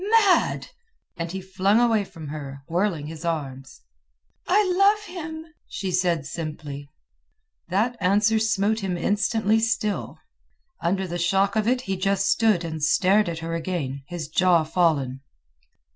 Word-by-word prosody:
"Mad!" 385 -3 +2 0.5
and 165 -1 -4
he 190 +1 -5
flung 190 +3 +2
away 230 -3 +3
from 160 -6 -10
her, 140 -2 -7
whirling 170 -2 0
his 160 +1 -8
arms. 135 - -4 0.7
"I 405 +2 +3
love 405 +2 +4
him," 320 -4 -7 0.2
she 190 -2 -4
said 175 -5 +1
simply. 145 -2 -6 0.8
That 215 +7 0
answer 210 +4 +3
smote 215 0 +1
him 190 -4 -2
instantly 210 +3 +1
still. 220 -2 -1 0.6
Under 190 +3 0
the 175 -1 -4
shock 195 +3 +2
of 215 0 +1
it 250 +1 +2
he 195 -5 -3
just 195 +1 +1
stood 210 -3 +3
and 160 -2 -5
stared 190 +5 +3
at 165 -1 -4
her 165 - -3
again, 160 -5 -3
his 175 -3 -5
jaw 175 0 +3
fallen. 155 -6 0
185 Hz, 145 wpm, -24 LUFS, 160-215 Hz, 0.8 s, love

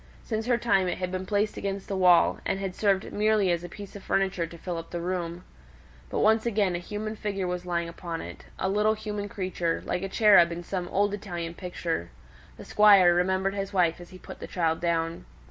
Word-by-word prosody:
Since 220 0 -3
her 245 -1 +3
time 195 -6 +2
it 175 - -2
had 180 -1 -3
been 185 0 -4
placed 210 +1 0
against 195 -1 -4
the 195 - -3
wall, 180 -2 +5
and - - -1
had 195 -2 -3
served 195 -1 0
merely 210 -3 +2
as 170 0 -1
a 175 - -7
piece 200 +2 -10
of 200 - -8
furniture 190 -3 0
to 170 - -11
fill 175 0 -5
up 165 - -10
the 175 - -4
room. 175 0 -3 0.7
But - - -1
once 220 +2 +3
again 205 -5 +1
a - - -2
human 210 +4 -5
figure 200 -3 -3
was 180 0 -4
lying 170 -1 -1
upon 170 0 -6
it; - - -9
a - - -1
little 210 +2 +2
human 210 -1 -5
creature, 185 -4 -2
like 180 - -2
a 195 - -3
cherub 200 -5 +6
in 170 +1 -5
some 180 0 -3
old 205 +2 +1
Italian 175 -5 -5
picture. 170 - -4 0.5
The - - -10
Squire 200 -4 +6
remembered 190 +2 +1
his 195 0 -4
wife 175 -2 +2
as 175 - -12
he 185 - -12
put - - -11
the - - -7
child 165 -2 0
down. 165 -1 -1
185 Hz, 220 wpm, -27 LUFS, 175-205 Hz, 0.7 s, cherub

